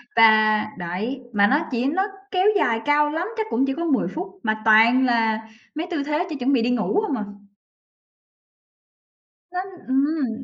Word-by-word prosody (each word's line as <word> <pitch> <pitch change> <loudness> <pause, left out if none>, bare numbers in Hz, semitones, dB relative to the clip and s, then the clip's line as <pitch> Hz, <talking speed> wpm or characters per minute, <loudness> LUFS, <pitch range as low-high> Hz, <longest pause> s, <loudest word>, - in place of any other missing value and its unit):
và 220 -1 +5
đấy, 190 +10 -4
mà 205 -1 +4
nó 295 +8 +1
chỉ 245 0 -1
nó 325 +8 +1 0.3
kéo 370 +1 +2
dài 225 -9 +1
cao 295 0 +3
lắm 325 +4 -3
chắc 440 - -1
cũng 260 +4 +1
chỉ 270 - -1
có 335 +4 -4
10 280 -6 +1
phút 355 +5 -5 0.2
mà 215 0 -1
toàn 230 +4 +5
là 225 -2 0 0.3
mấy 330 +3 -4
tư 295 -5 -1
thế 300 +4 -1
chuẩn 300 -3 -6
chuẩn 265 +3 +1
bị 245 - +3
đi 235 - 0
ngủ 245 - 0
hông 285 - -2
à. 215 - -3 2.3
Nó 360 - -3 0.3
ừm. 265 -3 -1
260 Hz, 180 wpm, -22 LUFS, 225-300 Hz, 2.3 s, và